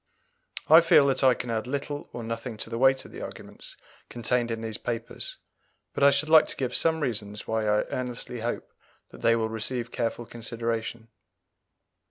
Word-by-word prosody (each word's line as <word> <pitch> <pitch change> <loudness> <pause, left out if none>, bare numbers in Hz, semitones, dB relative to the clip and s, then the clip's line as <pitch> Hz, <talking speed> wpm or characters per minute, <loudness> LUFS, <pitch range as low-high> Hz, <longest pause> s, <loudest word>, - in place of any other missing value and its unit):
I 160 +2 +9
feel 165 -4 +6
that 135 0 +1
I 130 -2 +6
can 120 - -5
add 110 +1 -2
little 145 +2 -4
or 120 - -6
nothing 115 0 -5
to 115 - -5
the 115 - -2
weight 130 0 +4
of - - -12
the - - -8
arguments - - -9 0.3
contained 120 0 0
in 115 -1 -3
these 110 -2 -4
papers, 115 -1 -5 0.6
but - - -1
I 140 - +9
should 140 +2 +1
like 160 0 +7
to - - -2
give 130 -3 -2
some 160 -1 +1
reasons 105 -6 -2
why 110 0 0
I 105 0 +2
earnestly 125 -1 -4
hope 120 +2 -4 0.4
that - - -13
they 115 - +4
will 110 -1 0
receive 120 +2 -2
careful 120 -1 -2
consideration. 115 0 -4
120 Hz, 185 wpm, -27 LUFS, 115-130 Hz, 0.6 s, I